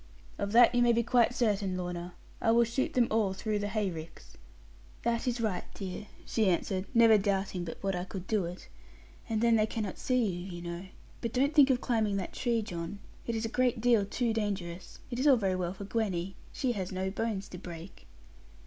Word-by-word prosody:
'Of 200 Hz, 0 st, -1 dB
that 240 Hz, +1 st, +7 dB
you 245 Hz, -, +3 dB
may 240 Hz, -1 st, +5 dB
be 235 Hz, 0 st, +2 dB
quite 245 Hz, +1 st, +3 dB
certain, 200 Hz, -5 st, +1 dB
Lorna. 175 Hz, -1 st, -5 dB, 0.3 s
I -, -, +2 dB
will 235 Hz, +1 st, +6 dB
shoot 235 Hz, +3 st, -1 dB
them 245 Hz, -2 st, +4 dB
all 215 Hz, -3 st, +2 dB
through 210 Hz, +2 st, -2 dB
the 205 Hz, -, -2 dB
hay 205 Hz, -2 st, -1 dB
ricks.' 160 Hz, 0 st, -10 dB, 0.7 s
'That 235 Hz, +1 st, 0 dB
is 245 Hz, -1 st, 0 dB
right, 215 Hz, -6 st, -1 dB
dear,' 195 Hz, +1 st, -6 dB, 0.2 s
she 220 Hz, -4 st, +2 dB
answered, 185 Hz, +2 st, 0 dB
never 225 Hz, -2 st, +7 dB
doubting 195 Hz, -2 st, -1 dB
but 165 Hz, -, -6 dB
what 195 Hz, -1 st, 0 dB
I 180 Hz, -, -2 dB
could 190 Hz, -1 st, -7 dB
do 205 Hz, -3 st, +1 dB
it; 175 Hz, +2 st, -8 dB, 0.6 s
'and 220 Hz, -1 st, 0 dB
then 230 Hz, -1 st, +5 dB
they 215 Hz, 0 st, +3 dB
cannot 210 Hz, -4 st, -4 dB
see 255 Hz, -2 st, +2 dB
you, 180 Hz, -1 st, -4 dB
you 175 Hz, -, -7 dB
know. 170 Hz, +1 st, -5 dB, 0.4 s
But 230 Hz, -1 st, -3 dB
don't 275 Hz, +4 st, +2 dB
think 285 Hz, -3 st, +7 dB
of 250 Hz, -2 st, +2 dB
climbing 220 Hz, -4 st, +1 dB
that 190 Hz, -, -4 dB
tree, 235 Hz, -3 st, 0 dB
John; 175 Hz, -2 st, -5 dB, 0.3 s
it 235 Hz, -, -1 dB
is 225 Hz, 0 st, -1 dB
a -, -, 0 dB
great 250 Hz, 0 st, +1 dB
deal 230 Hz, -2 st, +4 dB
too 230 Hz, +3 st, -1 dB
dangerous. 190 Hz, -5 st, -3 dB
It 240 Hz, -, -3 dB
is 275 Hz, -, +2 dB
all 270 Hz, -3 st, +7 dB
very 195 Hz, -4 st, 0 dB
well 180 Hz, -1 st, -2 dB
for 200 Hz, -, -7 dB
Gwenny; 195 Hz, -4 st, -2 dB, 0.2 s
she 260 Hz, -3 st, 0 dB
has 190 Hz, -5 st, -3 dB
no 190 Hz, 0 st, -2 dB
bones 205 Hz, -2 st, -2 dB
to 180 Hz, -, -8 dB
break.' 170 Hz, 0 st, -10 dB
210 Hz, 215 wpm, -30 LUFS, 185-235 Hz, 0.7 s, that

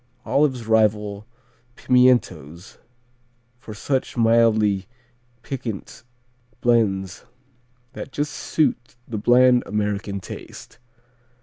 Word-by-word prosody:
Olives 130 Hz, -5 st, +1 dB
rival 105 Hz, -1 st, +1 dB, 0.5 s
pimientos 120 Hz, -, +1 dB, 0.8 s
for 110 Hz, -3 st, -10 dB
such 130 Hz, +3 st, -2 dB
mildly 110 Hz, -4 st, +3 dB, 0.6 s
piquant 120 Hz, -6 st, -6 dB, 0.6 s
blends 100 Hz, -6 st, 0 dB, 0.7 s
that 135 Hz, -, -8 dB
just 145 Hz, +1 st, -3 dB
suit 125 Hz, -6 st, -1 dB
the 110 Hz, -3 st, -4 dB
bland 125 Hz, +2 st, +4 dB
American 105 Hz, -1 st, -2 dB
taste. 95 Hz, -, -11 dB
115 Hz, 80 wpm, -22 LUFS, 105-125 Hz, 0.8 s, bland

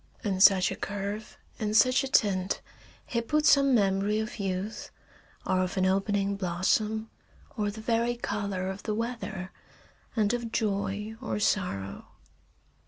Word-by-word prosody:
In 195 Hz, -4 st, -1 dB
such 190 Hz, -2 st, +6 dB
a -, -, -3 dB
curve, 205 Hz, +2 st, -5 dB, 0.2 s
in 215 Hz, -1 st, -1 dB
such 255 Hz, +5 st, +5 dB
a -, -, -2 dB
tint, 195 Hz, -6 st, +2 dB, 0.5 s
he 235 Hz, -, -1 dB
put 300 Hz, +6 st, 0 dB
some 275 Hz, -3 st, +6 dB
memory 200 Hz, 0 st, +2 dB
of 220 Hz, +1 st, -4 dB
youth, 195 Hz, +2 st, -3 dB, 0.6 s
or 185 Hz, -1 st, +2 dB
of 185 Hz, +1 st, -2 dB
an 185 Hz, -, +3 dB
opening 195 Hz, +1 st, +1 dB
blossom, 210 Hz, +4 st, 0 dB, 0.4 s
or 210 Hz, -3 st, 0 dB
the 215 Hz, +2 st, -7 dB
very 235 Hz, +1 st, +1 dB
color 200 Hz, -5 st, -3 dB
of 190 Hz, +1 st, -5 dB
the 215 Hz, -, -2 dB
weather, 225 Hz, -5 st, -4 dB, 0.6 s
and 215 Hz, -1 st, +2 dB
of 240 Hz, -2 st, -3 dB
joy 210 Hz, 0 st, -1 dB
or 235 Hz, -, -2 dB
sorrow. 100 Hz, -, -1 dB
205 Hz, 145 wpm, -28 LUFS, 190-225 Hz, 0.6 s, such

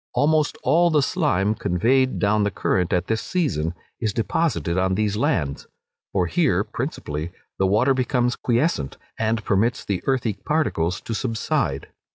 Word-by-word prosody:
Almost 155 Hz, 0 st, +2 dB
all 175 Hz, +1 st, +4 dB
the 150 Hz, -3 st, +3 dB
slime 130 Hz, -, +1 dB
conveyed 125 Hz, +8 st, +1 dB
down 105 Hz, +1 st, +2 dB
the 100 Hz, -, +2 dB
current 90 Hz, -2 st, 0 dB
at 90 Hz, -, +1 dB
this 110 Hz, -1 st, -1 dB
season 90 Hz, -, -1 dB, 0.2 s
is 110 Hz, -4 st, -1 dB
deposited 115 Hz, -, 0 dB
on 95 Hz, 0 st, +1 dB
these 105 Hz, 0 st, 0 dB
lands; 75 Hz, -9 st, -1 dB, 0.4 s
for 95 Hz, -2 st, +1 dB
here, 85 Hz, -, +2 dB
principally, 75 Hz, +3 st, -4 dB, 0.3 s
the 95 Hz, -, +3 dB
water 115 Hz, +8 st, +3 dB
becomes 125 Hz, -1 st, +1 dB
quiescent, 120 Hz, -, 0 dB, 0.2 s
and 110 Hz, 0 st, 0 dB
permits 105 Hz, +5 st, +1 dB
the 100 Hz, -3 st, -2 dB
earthy 125 Hz, -5 st, +1 dB
particles 95 Hz, -, -1 dB
to 115 Hz, -, -5 dB
subside. 115 Hz, -1 st, -1 dB
110 Hz, 150 wpm, -23 LUFS, 95-130 Hz, 0.4 s, all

